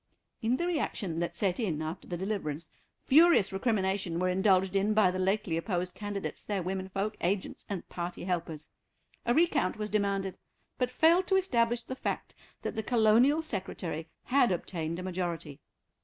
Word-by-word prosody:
In 235 +3 +1
the 345 - -1
reaction 220 - -1
that 170 0 -2
set 185 +2 0
in 180 -10 -1
after 155 +1 -5
the 175 - -3
deliverance 170 -5 -3 0.3
furious 305 - +6
recrimination 190 -4 0
were 185 +1 +1
indulged 190 0 +3
in 205 +2 +2
by 205 -4 +5
the 185 - -3
lately 190 -2 +1
opposed 180 0 -2
candidates, 205 -2 -5
their 200 -3 -2
women 190 +1 -3
folk, 200 +3 -2
agents, 185 +2 -2
and 195 -4 -4
party 175 0 -5
helpers. 170 -4 -3 0.6
A 240 - +4
recount 310 - +2
was 210 0 -4
demanded, 200 -2 0 0.4
but 250 -1 +1
failed 330 +8 +4
to 385 - +3
establish 240 -10 +2
the 260 - -6
fact - - -3 0.3
that - - -2
the 220 - -1
Colonial 240 +7 +4
Secretary 185 - -4
had 255 -3 +3
obtained 170 -2 -3
a 180 - -5
majority. 170 -5 -4
195 Hz, 165 wpm, -30 LUFS, 180-230 Hz, 0.6 s, furious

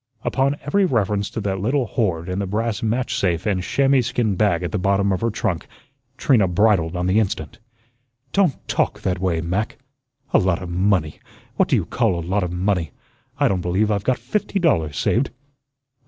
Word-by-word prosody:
Upon 140 +2 +1
every 195 +8 +2
reference 105 - 0
to - - -5
that 95 -1 -2
little 125 +6 +1
hoard 95 -6 -1
in 90 +1 -2
the 100 - -2
brass 105 +2 -1
match 115 +3 -1
safe 85 0 0
and 100 -4 +1
chamois 135 +6 +2
skin 115 -3 0
bag 90 -4 +1
at 85 - -3
the 105 - -1
bottom 100 +1 +2
of 95 - -1
her 115 - +1
trunk, 95 -6 -2 0.5
Trina 115 -9 +3
bridled 90 -2 +2
on 90 0 -1
the 95 +4 +3
instant. 95 -8 -3 0.7
"Don't 190 -9 +1
TALK - - 0
that 90 -1 -1
way, 90 -3 0
Mac. 95 +6 -2 0.6
'A - - +6
lot 95 -4 +1
of 90 - -7
money.' 90 -4 +1 0.4
What - - +3
do - - +4
you - - 0
call 115 -7 +1
a 85 - -4
lot 95 +4 0
of 90 -2 -2
money? 90 -2 0 0.5
I - - +4
don't 95 -2 0
believe 95 +5 +1
I've 100 -2 0
got 130 +3 +1
fifty 210 -1 -2
dollars 80 - +1
saved." 125 +4 +1
100 Hz, 195 wpm, -21 LUFS, 90-115 Hz, 0.7 s, A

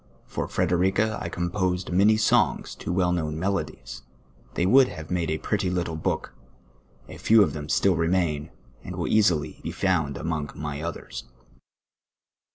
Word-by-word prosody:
l''or - - -2
Frc - - 0
derica 95 +5 +1
I 85 - -3
composed 90 +1 -1
many 100 +4 +5
sonj^s 110 - +2
to - - -4
well 90 0 +2
kno^^^l 80 -3 -1
melodies, 80 -7 -3 0.5
'i'hey 90 - +1
would 130 +6 +6
have 80 -1 -8
made 85 -3 0
a 80 - 0
pretty 100 +2 -1
little 85 -2 -2
book; 80 - -2 0.7
a - - -10
few 110 -1 +5
of 75 - -1
them 75 -1 -6
still 95 +3 +3
re 80 0 +1
main, 85 -4 0 0.3
and - - -7
will - - -2
easily 80 -8 +2
be - - -5
found 80 -7 0
amonp: 80 -3 -3
my 75 -1 -5
others. 75 -8 -6
85 Hz, 165 wpm, -25 LUFS, 80-95 Hz, 0.7 s, would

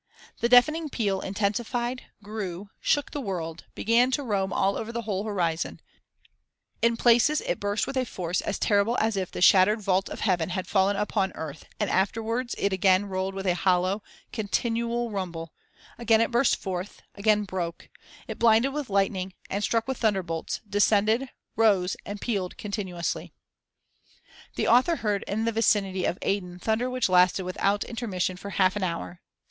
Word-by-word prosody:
The 235 - +1
deafening 305 +6 +5
peal 200 -7 -1
intensified, 235 +5 -2 0.2
grew, 200 -2 -6
shook 290 - +1
the 290 - -4
world, 170 -7 -5
began 235 +3 +3
to 270 +2 -1
roam 200 -5 -1
all 195 +1 +1
over 225 +1 -4
the 235 0 -4
whole 200 -1 -2
horizon; 170 -6 -1 1.0
in 230 0 +3
places 240 +6 +4
it - - -2
burst 205 +1 0
with - - -5
a 260 - +2
force 180 -7 -2
as - - -3
terrible 205 +3 +2
as 220 -1 +1
if 190 -2 -2
the - - -2
shattered 195 +4 +6
vault 195 -2 0
of - - -7
heaven 180 -5 +1
had 185 +1 -3
fallen 195 0 +2
upon 200 -1 0
earth 155 -1 -7
and 210 - +1
afterwards 225 +5 0
it 200 -1 0
again 190 +1 +3
rolled 190 0 -3
with 195 0 -5
a 180 - +3
hollow, 185 +2 +1 0.3
continual 235 +2 -1
rumble; 170 -5 -5 0.5
again 225 -2 +4
it 230 - +1
burst 240 +2 +3
forth, 185 0 -6
again 210 +1 +2
broke, 180 -4 -5 0.4
it - - -6
blinded 230 +4 +4
with 295 -4 -4
lightning, 195 -2 0 0.2
and 200 +2 -1
struck 230 +2 0
with 265 -2 -3
thunderbolts, 185 -7 -1
descended, 215 +5 +2 0.3
rose, 200 -5 +3
and 205 0 -5
pealed 195 -6 -2
continuously.* 190 -5 -4 0.6
[* - - -26
The - - 0
author 255 +8 +4
heard 210 -7 -1
in 220 +3 -1
the 230 - +1
vicinity 200 -4 +1
of 175 - -1
Aden 180 -3 -2
thunder 220 +6 0
which 255 -1 0
lasted 180 +1 +4
without 195 +3 0
intermission 195 -6 -3
for 200 - -8
half 190 -1 +2
an 205 - -2
hour. 90 - -4
205 Hz, 170 wpm, -26 LUFS, 185-230 Hz, 1.0 s, shattered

